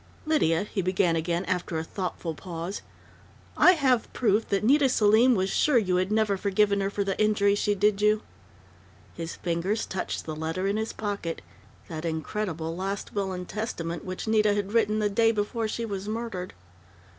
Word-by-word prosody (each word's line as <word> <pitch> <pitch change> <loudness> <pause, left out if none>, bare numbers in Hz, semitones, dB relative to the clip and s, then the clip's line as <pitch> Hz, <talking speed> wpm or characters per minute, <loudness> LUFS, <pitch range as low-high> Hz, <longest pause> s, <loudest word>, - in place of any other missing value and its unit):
"Lydia," 200 - +2
he 205 -1 -3
began 180 -2 +1
again, 170 +3 -1
after 180 -2 -2
a 160 - -2
thoughtful 175 -1 -4
pause, 170 +3 -6 0.7
"I 365 - +7
have 260 -8 +1
proof 220 -2 +1
that 200 +1 +1
Nita 275 +4 +4
Selim 230 +2 +5
was 190 -1 0
sure 295 -5 +3
you 185 -5 +2
had 185 +2 0
never 215 -2 +2
forgiven 200 +1 +2
her 195 - 0
for 200 0 -1
the 195 -1 -1
injury 205 -1 +3
she 205 0 +1
did 205 +1 +2
you." 210 +1 +3 0.9
His 165 0 -6
fingers 180 +6 -1
touched 190 - -4
the 155 - -4
letter 160 +4 -3
in 200 +2 0
his 220 +1 -2
pocket 200 -6 -4 0.4
that 160 -1 -6
incredible 165 0 -3
"Last 195 +2 -4
Will 195 -2 -1
and 180 -1 -5
Testament" 175 -7 -4
which 185 +3 -5
Nita 215 -1 +3
had 205 0 -2
written 215 -2 +2
the 210 -1 +2
day 225 +2 +3
before 220 +1 -1
she 230 +2 -3
was 200 -2 -5
murdered.... 215 -5 -4
200 Hz, 180 wpm, -27 LUFS, 180-215 Hz, 0.9 s, I